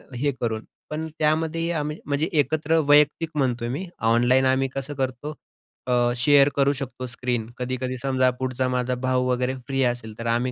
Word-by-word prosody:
हे 140 +3 0
करून. 110 -2 -1 0.3
पण 155 +1 -3
त्यामध्येही 160 +2 +1
आम्ही 150 -1 -2
म्हणजे 145 +2 0
एकत्र 155 +2 +1
वैयक्तिक 150 +2 +4
म्हणतोय 125 -4 0
मी 145 +10 -3 0.2
ऑनलाईन 120 +3 +4
आम्ही 130 +1 +2
कसं 135 +2 -4
करतो 130 +2 -3 0.5
अ, 120 -1 +3
शेअर 140 +3 +5
करू 140 0 +3
शकतो, 130 -2 -6
स्क्रीन 120 -2 -3
कधी-कधी 130 0 -3
समजा 130 0 +2
पुढचा 130 0 -1
माझा 125 0 0
भाऊ 130 0 +2
वगैरे 125 +1 0
फ्री 135 -1 0
असेल, 120 -3 -2
तर 115 - -5
आम्ही 120 +2 +1
130 Hz, 165 wpm, -24 LUFS, 125-145 Hz, 0.5 s, शेअर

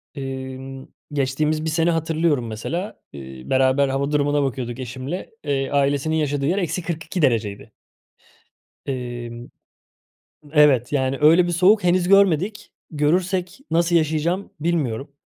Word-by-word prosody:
Emm, 135 -1 -7 0.3
geçtiğimiz 150 +3 0
bir - - 0
sene 165 +2 +2
hatırlıyorum 160 -5 0
mesela, 165 - -5
ııı, 65 -2 -10
beraber 130 +1 +3
hava 140 +2 -1
durumuna 145 0 +2
bakıyorduk 125 -2 -3
eşimle. 130 +7 -6
Eee, 135 -2 -1
ailesinin 140 +2 +1
yaşadığı 145 -3 0
yer 175 +7 +1
-42 170 -2 -3
dereceydi. 110 -7 0 1.2
Emm 120 -2 -5 1.0
Evet, 145 -5 +4
yani 135 -1 0
öyle 165 +4 +6
bir 175 - -2
soğuk 185 +4 +4
henüz 180 0 +2
görmedik. 200 +2 +3 0.2
Görürsek 180 +5 0
nasıl 170 +1 +2
yaşayacağım 160 +4 0
bilmiyorum. 145 -6 -1
145 Hz, 120 wpm, -22 LUFS, 130-170 Hz, 1.2 s, öyle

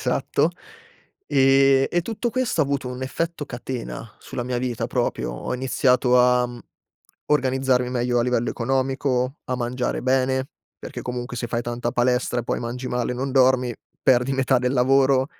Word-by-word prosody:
Esatto. - - +1 0.8
E 135 -1 +4
e 175 -1 +1
tutto 230 +3 -3
questo 255 -8 0
ha - - +4
avuto 140 -2 -2
un 125 +1 -6
effetto 165 +4 -3
catena, 120 -3 -6
sulla 125 - -6
mia 125 0 -2
vita 125 -2 -2
proprio. - - -1
Ho - - -4
iniziato 125 0 +2
a, 125 0 +4
mhmm, 120 0 -9 0.7
organizzarmi 130 -3 +1
meglio 120 -1 0
a - - +3
livello 120 -1 0
economico, 130 +1 -1
a 130 - -2
mangiare 125 +1 -2
bene, 130 0 +1 0.3
perché - - -7
comunque 125 0 -5
se 120 - -3
fai 115 0 -2
tanta 120 0 -3
palestra 125 0 +1
e - - -9
poi - - -1
mangi 125 +2 -4
male 125 0 -1
e - - -4
non 135 +2 -3
dormi, 130 -2 +3 0.3
perdi 125 +1 +3
metà 135 -1 +2
del 125 +1 0
lavoro. 135 +1 +3
125 Hz, 170 wpm, -23 LUFS, 125-135 Hz, 0.8 s, E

